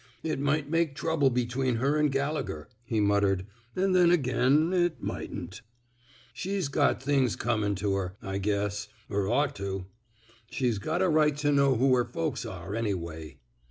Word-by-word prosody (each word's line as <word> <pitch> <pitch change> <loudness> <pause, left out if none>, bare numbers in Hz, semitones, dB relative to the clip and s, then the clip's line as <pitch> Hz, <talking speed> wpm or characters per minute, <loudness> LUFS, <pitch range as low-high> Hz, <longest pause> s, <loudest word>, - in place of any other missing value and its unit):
It 155 -3 -2
might 145 +1 0
make 165 -2 0
trouble 160 -3 +2
between 125 +1 0
her 135 +6 +1
an' 150 - +4
Gallegher," 140 - -2 0.2
he 115 -2 -1
muttered. 100 -2 +2 0.2
*' 120 0 -34
An' 190 +1 +1
then 180 -2 +5
again 145 +1 +3
it 175 -2 +1
mightn't.... 90 +2 -6 0.7
She's 190 -4 -2
got 140 -2 +1
things 135 -4 +2
comin' 105 -3 0
to 100 +1 -1
her, 95 -1 -3
I 95 0 -4
guess 100 0 -1
— 105 - -23
er 100 -1 0
ought 140 +4 +1
to. 95 -1 -4 0.6
She's 120 -6 0
got 160 - -1
a - - +3
right 155 -3 +3
to 145 0 +1
know 140 -2 +4
who 130 +2 +3
her 125 -1 +3
folks 120 -9 -3
are, 100 - -7
anyway." 85 - -4
125 Hz, 170 wpm, -28 LUFS, 100-150 Hz, 0.7 s, then